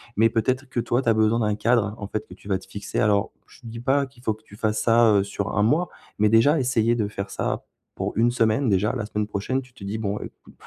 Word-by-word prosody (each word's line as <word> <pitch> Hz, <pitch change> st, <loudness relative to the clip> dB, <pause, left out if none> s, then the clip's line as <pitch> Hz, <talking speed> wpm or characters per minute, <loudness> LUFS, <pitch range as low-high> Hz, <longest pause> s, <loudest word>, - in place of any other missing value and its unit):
mais 115 Hz, +2 st, +4 dB
peut-être 130 Hz, +5 st, -1 dB
que, 125 Hz, -, -2 dB
toi, 120 Hz, +2 st, +1 dB
tu 125 Hz, -, 0 dB
as -, -, +5 dB
besoin 110 Hz, +1 st, +2 dB
d'un 105 Hz, -2 st, +1 dB
cadre, 110 Hz, -1 st, +1 dB
en 100 Hz, -, -6 dB
fait, 110 Hz, -, -4 dB
que -, -, -12 dB
tu 100 Hz, -, -15 dB
vas 95 Hz, -2 st, +1 dB
te 95 Hz, -, -14 dB
fixer. 100 Hz, +1 st, -5 dB
Alors 100 Hz, -1 st, +2 dB
je -, -, -18 dB
te -, -, -17 dB
dis 115 Hz, +1 st, -7 dB
pas 140 Hz, +3 st, +2 dB
qu'il 125 Hz, -2 st, -19 dB
faut 110 Hz, -, +1 dB
que 110 Hz, +1 st, -18 dB
tu 100 Hz, -, -15 dB
fasses 110 Hz, 0 st, -1 dB
ça, 115 Hz, -1 st, +5 dB
heu, 100 Hz, -, +4 dB
sur 100 Hz, +1 st, -4 dB
1 105 Hz, -, +4 dB
mois 155 Hz, +11 st, +2 dB, 0.3 s
mais 105 Hz, 0 st, +4 dB
déjà 115 Hz, +8 st, +5 dB
essayer 120 Hz, -4 st, +2 dB
de 105 Hz, -3 st, -1 dB
faire 100 Hz, -1 st, -5 dB
ça -, -, -2 dB, 0.3 s
pour -, -, -3 dB
1 120 Hz, +2 st, +4 dB
semaine 115 Hz, +2 st, +2 dB
déjà. 100 Hz, +1 st, +2 dB
La 115 Hz, -4 st, -3 dB
semaine 105 Hz, 0 st, -2 dB
prochaine 105 Hz, +6 st, -2 dB
tu 125 Hz, -1 st, -18 dB
te 100 Hz, -, -13 dB
dis: 100 Hz, +3 st, -3 dB
«Bon, 105 Hz, -1 st, -2 dB
écoute, -, -, -11 dB
110 Hz, 275 wpm, -24 LUFS, 105-120 Hz, 0.3 s, as